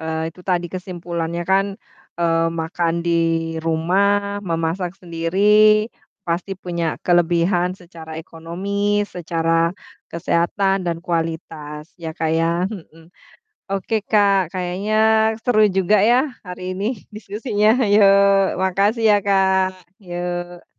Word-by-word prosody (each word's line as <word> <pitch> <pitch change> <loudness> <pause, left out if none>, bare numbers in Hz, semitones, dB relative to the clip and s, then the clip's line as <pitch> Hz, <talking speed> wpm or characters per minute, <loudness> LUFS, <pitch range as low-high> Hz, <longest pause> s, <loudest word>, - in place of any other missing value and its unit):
eee, 160 0 -3
itu 180 - -15
tadi 175 -1 +1
kesimpulannya 175 -2 -4
kan, 195 +1 +3 0.5
eee, 165 -1 +2
makan 165 +1 -1
di - - +2 0.6
rumah, 200 +5 +1
memasak 165 +2 -2
sendiri 205 +6 +3 0.4
pasti 175 +3 -2
punya 170 -2 -4 0.2
kelebihan 175 +1 +2
secara 165 -3 -11
ekonomi, 200 +6 -2
secara 165 -2 -1 0.4
kesehatan 180 +3 0
dan 170 -1 -1
kualitas 160 -2 -4
ya, 165 -1 -5
Kak 160 0 0
ya, 165 - +2 0.2
mhm. 165 -4 -11 0.6
Oke, 195 +3 -2
Kak, 200 -4 +2
kayaknya 185 +3 -2 0.5
seru 215 -3 +3
juga 190 +2 +3
ya 240 +2 +5 0.3
hari 180 0 -6
ini 200 - -3 0.3
diskusinya, 210 0 -1 0.2
hayo 205 0 +5 0.6
makasih 200 +5 +1
ya, - - +5
Kak, 190 -1 +2 0.3
yok. 175 0 -5
180 Hz, 110 wpm, -20 LUFS, 165-200 Hz, 0.6 s, ya